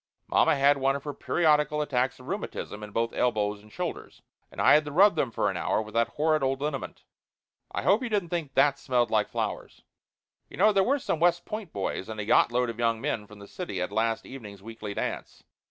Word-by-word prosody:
Mamma - - +3
had 140 +1 +4
one 135 +1 +2
of 140 - -5
her 145 - -5
periodical 150 -1 +2
attacks 130 -4 0
of 130 - -14
rheumatism 185 - -5
in 105 - -7
both 115 +2 -1
elbows 105 -4 0
and 105 0 -18
shoulders, - - -6 0.3
and - - -11
I - - +6
had 155 - +5
to 150 - -5
rub 195 +7 +6
them 140 -5 0
for - - -1
an - - -1
hour - - 0
with 110 0 -6
that 115 0 +2
horrid 155 0 +2
old 135 0 0
liniment. 145 -1 -4 0.7
I - - -3
hope 205 +5 +4
you 250 - -3
didn't 200 -6 -1
think 160 -6 -3
that 140 -1 +4
smelled 125 -3 0
like 105 -1 +2
flowers. - - -4 0.7
You - - -11
know, 210 +3 +5
there 195 -1 +4
were 275 +8 +2
some 170 - -2
West 175 +1 +2
Point 215 -5 -6
boys 95 +1 -3
and 110 -1 -6
a 105 - -3
yacht 120 - +4
load 125 0 +1
of 115 - -13
young 115 -1 +1
men 105 -1 -3
from 105 - -14
the 100 0 -12
city 170 - -5
at 90 - -2
last 115 0 0
evening's 105 -7 -10
weekly 110 -2 -7
dance. - - -5
135 Hz, 230 wpm, -27 LUFS, 110-155 Hz, 0.7 s, I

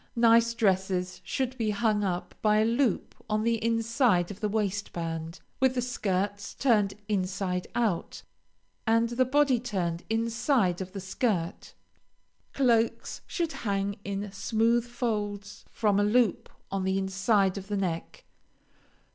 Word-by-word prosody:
Nice 230 0 +5
dresses 185 -3 0
should 255 +8 -2
be 220 -2 +1
hung 210 0 +1
up 180 -2 -2
by 210 -1 +4
a 215 - +4
loop 235 +2 +1 0.2
on 215 0 +1
the 230 -1 0
inside 230 -5 +2
of 205 - -9
the 210 - -1
waistband, 175 -5 -3 0.2
with 260 -1 +3
the 250 - +1
skirts 205 -4 -2
turned 210 -7 +2
inside 185 -2 -1
out, 220 -8 -1 0.6
and 230 +1 +3
the 250 +2 +2
body 270 -1 +3
turned 180 -8 -2
inside 230 - +1
of 185 0 -6
the 200 - -5
skirt. 190 -2 -2 0.8
Cloaks 235 -4 +1
should 335 -3 -2
hang 200 -4 -2
in 200 0 -4
smooth 225 +4 +1
folds 210 -4 -3
from 205 -3 +2
a - - +3
loop 220 0 +2 0.2
on 195 -1 -1
the 190 0 +1
inside 190 0 +2
of 195 -1 -7
the 205 0 -2
neck. 175 -4 -3
210 Hz, 140 wpm, -28 LUFS, 190-230 Hz, 0.8 s, Nice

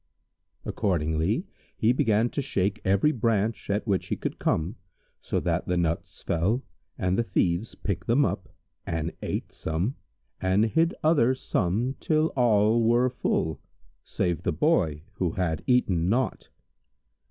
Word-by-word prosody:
Accordingly 85 - 0 0.3
he 115 +3 +3
began 115 -1 +2
to - - -1
shake 100 -5 -1
every 100 +9 +3
branch 115 -4 0
at 100 +2 0
which 100 -4 0
he - - -1
could - - -5
come, 85 +8 0 0.5
so - - -1
that - - -1
the 90 - +1
nuts 85 -1 -2
fell 95 +10 0 0.3
and 90 +3 0
the - - +3
thieves 90 +1 0
picked 95 -2 -4
them 130 +5 +4
up - - -3 0.3
and 80 0 -3
ate - - -3
some 85 +10 -2 0.5
and 95 +3 +3
hid 165 - +2
other 145 -6 +4
some 115 +3 -1
till 155 0 +2
all 115 -2 +4
were 120 +2 +3
full, 80 - -1 0.4
save 90 -2 -1
the - - 0
Boy 80 - +1
who 90 -3 0
had 90 -4 -1
eaten 95 -9 +2
naught. 125 +5 -1
105 Hz, 140 wpm, -27 LUFS, 85-120 Hz, 0.5 s, them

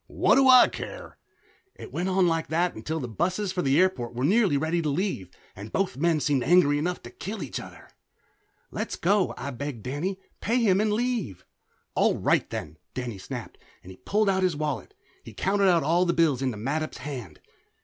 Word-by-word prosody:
"What - - +2
do 270 -1 +5
I 255 -1 +9
care?" - - -8 0.6
It - - -11
went 175 +5 -1
on 190 0 +3
like 165 -1 0
that 170 +3 +1
until 155 +9 -4
the 130 - -4
busses 185 - -1
for 185 -1 -1
the 140 +1 +3
airport 130 -11 +1
were 125 - -2
nearly 195 -3 +3
ready 160 +4 0
to 155 - -1
leave 145 - -2 0.3
and 100 +3 -9
both 195 -8 -1
men 160 +3 +2
seemed 140 -3 +1
angry 150 -5 +4
enough 175 +3 -2
to - - -10
kill 205 +1 -6
each 135 - -5
other. - - -12 0.8
"Let's - - -3
go," 195 +2 +1
I 140 - -5
begged 130 -3 -6
Danny. 165 +9 -3 0.2
"Pay 235 +3 0
him 200 -4 +3
and 215 0 +1
leave." 215 - -2 0.5
"All - - +2
right - - +1
then!" - - -6 0.2
Danny 120 -5 -4
snapped, - - -8 0.2
and 95 +1 -11
pulled 210 +1 +1
out 190 -1 +2
his 180 -4 +1
wallet. 155 - -4 0.3
He - - -11
counted 195 0 +2
out 170 -4 +3
all 170 +5 +3
his 170 - +1
bills 155 -6 +2
into 130 -5 -1
Mattup's 150 +8 -3
hand. 125 - -7
165 Hz, 195 wpm, -26 LUFS, 135-190 Hz, 0.8 s, I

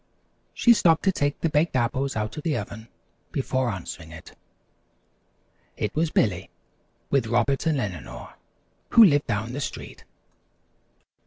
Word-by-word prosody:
She 240 - +6
stopped 165 -7 +3
to 195 - +3
take 145 -5 -1
the 165 - +1
Baked 150 +1 +1
Apples 130 +3 0
out 110 -1 -3
of 150 - -5
the 150 -4 -1
oven, 110 +1 -7 0.4
before 130 -2 -1
answering. 90 -5 -7 1.7
It - - -2
was 160 +1 +1
Billy 95 - 0 0.6
with 135 -5 +2
Robert 120 +6 +1
and 155 -3 +1
Eleanor 95 - -6 0.6
who 230 - +8
lived 145 -7 +4
down 110 +4 -2
the 140 - -4
street. - - -7
135 Hz, 135 wpm, -25 LUFS, 110-150 Hz, 1.7 s, who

